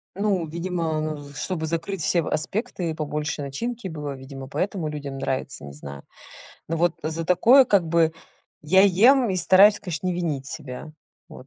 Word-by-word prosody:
Ну 195 -3 0
видимо, 165 -1 -2
ну 150 -2 -5
чтобы 160 +3 -3
закрыть 170 +4 -3
все 170 +3 +2
в 160 - -6
аспекты 190 +2 -2
и - - -2
побольше 150 -1 -3
начинки 220 - -4
было, 150 -4 -5
видимо 135 0 -9
поэтому 185 +2 -2
людям 145 -2 -5
нравится, 135 - -3
не 70 - -9
знаю. 70 -1 -9 0.7
Но 165 - -1
вот 170 0 +2
за 160 +2 -3
такое 235 +10 +6
как 200 -7 +2
бы 165 0 +2 0.5
я 190 +6 +5
ем 230 +7 +5
и 185 - -1
стараюсь, 200 +3 +6
конечно, 175 -3 -4
не 180 - +1
винить 155 -6 -2
себя. 135 +3 -8 0.4
Вот. 130 - -12
165 Hz, 175 wpm, -24 LUFS, 150-185 Hz, 0.7 s, такое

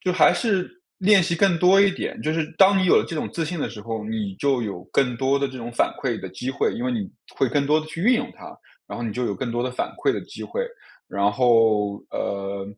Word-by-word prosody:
就 185 - 0
还 - - +5
是 195 -6 0 0.3
练 200 0 +5
习 170 - 0
更 175 -1 +3
多 185 +3 +6
一 200 0 +5
点， - - -5
就 155 - 0
是 160 -1 -2
当 195 0 +6
你 185 - +2
有 180 - +5
了 - - +3
这 165 - -4
种 - - -2
自 165 - -2
信 170 +1 -4
的 - - -2
时 110 - -9
候， 110 0 -5
你 105 -3 -3
就 135 -4 +1
有 95 -5 -5
更 125 -3 +1
多 135 +3 +1
的 140 -1 0
这 130 - -9
种 120 0 -7
反 - - +2
馈 125 -5 -2
的 95 - -6
机 95 +8 -5
会， 140 - 0
因 240 +1 -4
为， 255 - 0
你 215 -4 -3 0.2
会 135 - +1
更 140 +3 0
多 155 +2 +3
地 155 - -9
去 165 - -7
运 245 +5 +5
用 240 - -2
它， - - -11 0.3
然 - - -7
后 - - -4
你 110 - -3
就 125 +2 -2
有 100 - -1
更 130 -3 -4
多 120 +1 -2
的 125 0 -3
反 - - -2
馈 - - +1
的 - - -3
机 - - -9
会， 485 - -3 0.4
然 100 +1 +1
后， 110 -4 +3
呃， 100 0 -3
135 Hz, 290 characters per minute, -23 LUFS, 115-180 Hz, 0.4 s, 多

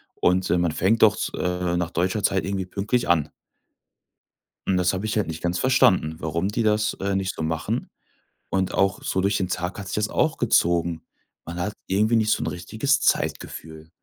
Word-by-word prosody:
und, 90 +1 +1
ähm, 90 - +3
man 85 -2 +1
fängt 100 +8 +1
doch 105 -1 +6
z - - -3
äh, 90 -1 -1
nach 90 -1 -2
deutscher 95 +5 0
Zeit 95 - +1
irgendwie 95 -1 -2
pünktlich 105 +6 -1
an.“ 80 -4 +3 1.4
Und 95 - +2
das 90 0 +2
habe 95 +3 -3
ich 110 - -1
halt 105 - +1
nicht 80 0 -6
ganz 90 +1 0
verstanden, 95 -11 +3
warum 85 +3 -1
die 115 +3 -1
das, 105 0 +2
äh, 100 0 -1
nicht 95 -1 -2
so - - -4
machen, 80 0 -2 0.6
und 95 -1 0
auch 95 -1 +1
so 95 - 0
durch 100 +2 +1
den 95 - -1
Tag 90 +2 -3
hat 100 - -7
sich - - -4
das 105 +1 0
auch 160 0 +1
gezogen. 85 -7 +2 0.4
Man 85 +1 -6
hat 105 +4 -2
irgendwie 105 +4 +2
nicht 110 -1 +1
so - - +1
'n - - -3
richtiges 110 +10 0
Zeitgefühl. 80 0 -2
95 Hz, 200 wpm, -24 LUFS, 85-105 Hz, 1.4 s, doch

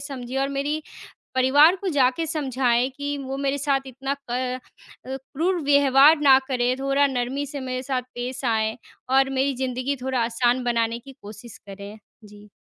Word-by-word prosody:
समझे 265 -3 -6
और 275 - 0
मेरी 285 +3 -2 0.5
परिवार 285 +7 +5
को 385 +1 -6
जाके 275 0 +2
समझाएँ 260 -5 0
कि 285 0 -3
वो 270 0 -5
मेरे 275 0 -1
साथ 275 -1 -1
इतना 270 +2 -4 0.2
क 250 +1 -2 0.5
अ, 265 - -5
क्रूर 325 +7 -2
व्यवहार 280 +2 +5
ना 270 -2 +7
करें, 250 -1 0
थोड़ा 275 +1 +2
नरमी 265 +2 -2
से 285 0 -7
मेरे 255 -1 -4
साथ 260 -1 -1
पेश 250 +2 -5
आएँ, 220 -1 0 0.3
और 270 +1 +3
मेरी 270 +1 0
ज़िंदगी 255 +2 -2
थोड़ा 260 0 -1
आसान 240 +2 +1
बनाने 235 -1 0
की 270 +3 -13
कोशिश 210 +2 -11
करें। 200 +2 -9 0.3
जी। 210 0 -15
265 Hz, 165 wpm, -23 LUFS, 245-280 Hz, 0.5 s, ना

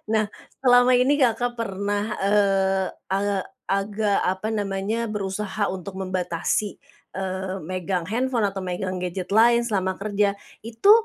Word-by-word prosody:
Nah 215 -1 +3 0.4
selama 245 0 +6
ini 265 +4 +4
Kakak, 245 -1 +2
pernah, 205 -1 -2
eee, 195 -1 +2 0.2
agak 195 0 0 0.3
agak 200 +1 +1
apa 190 +3 -1
namanya 205 +2 -1
berusaha 205 0 -2
untuk 190 +1 -6
membatasi, 185 +1 -1 0.4
eee, 190 0 -3
megang 180 +1 -2
handphone 245 -1 +1
atau 195 0 -5
megang 185 +1 -3
gadget 180 0 -4
lain 235 +2 +5
selama 190 -5 0
kerja 205 0 +1 0.3
itu, 230 - +2
200 Hz, 125 wpm, -24 LUFS, 190-220 Hz, 0.4 s, selama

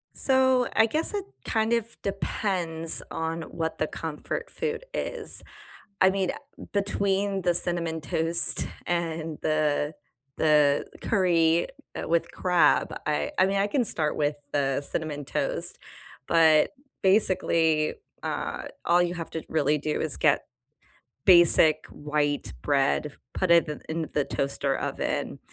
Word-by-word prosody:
So, 260 -2 +2
I 225 - +4
guess 315 - +3
it, 405 -1 -2 0.2
kind 220 0 0
of, 230 0 -2
depends 180 -4 0
on 160 0 -4
what 160 0 -5
the 155 - -1
comfort 160 - -6
food 465 +1 -4
is, - - 0 0.6
I 190 - +5
mean, 190 -1 -1
uh, 285 0 -11
between 200 -1 -1
the 175 -1 +1
cinnamon 170 -2 +2
toast 165 +2 +5 0.2
and 165 -2 -3
the 155 -1 0 0.4
the 150 -2 +3 0.2
curry, 170 -5 +2 0.3
uh, - - -6
with 170 0 0
crab, 180 -2 +2
I 75 0 -1
I 185 - +5
mean 195 +1 -1
I 195 +1 +2
can 245 +4 0
start 155 -7 -1
with 145 0 -1 0.2
the 135 -1 0
cinnamon 145 0 -4
toast, - - -3 0.5
but 160 -2 +4 0.3
basically, 165 -6 +3 0.3
uh, - - -4 0.2
all 175 +1 +3
you 175 0 -2
have 165 -2 -7
to 160 - -5
really 150 -1 +1
do 150 +1 -3
is 155 -3 +2
get 145 -2 +1 0.8
basic 165 -3 +5
white 145 -1 -2
bread, 145 +1 0 0.2
put 185 -2 -1
it 170 -1 +5
in 150 -1 -6
in 160 0 -3
the 145 - +1
toaster 140 0 -2
oven, - - -3
165 Hz, 135 wpm, -26 LUFS, 155-195 Hz, 0.8 s, I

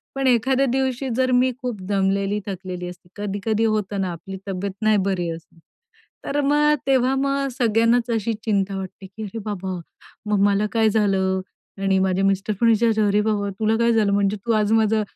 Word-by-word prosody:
पण 270 -1 0
एखाद्या 255 +3 +3
दिवशी 265 0 -1
जर 255 0 +1
मी 260 0 +2
खूप 240 -6 -4
दमलेली 200 +1 +1
थकलेली 185 -2 -5
असते, 175 0 -14
कधी-कधी 205 +2 -1
होतं 200 -1 -2
ना 185 -2 -1
आपली 190 +3 -8
तब्येत 195 +1 -3
नाही 215 -1 +3
बरी 175 -3 -1
असत. 165 0 -9 0.7
तर 290 +1 -1
मग 295 +1 +3
तेव्हा 265 -1 +3
मग 275 0 0
सगळ्यांनाच 230 +1 +2
अशी 225 0 0
चिंता 200 -3 0
वाटते 190 0 -7
की 205 +4 -10
"अरे 210 +3 -6
बाबा! 190 -3 -4 0.5
मम्माला 205 0 +3
काय 225 -1 +3
झालं?" 190 -3 +1 0.4
आणि 195 -1 +2
माझ्या 190 0 +1
मिस्टर 195 +2 +1
पण 230 - +4
विचारता 220 -1 +3
"अरे 205 +1 +3
बाबा! 205 -1 0
तुला 220 +1 +2
काय 235 0 +3
झालं? 210 -3 +2
म्हणजे 200 +1 +1
तू 230 - +2
आज 215 0 +2
माझा 220 -1 +3
210 Hz, 180 wpm, -22 LUFS, 195-235 Hz, 0.7 s, पण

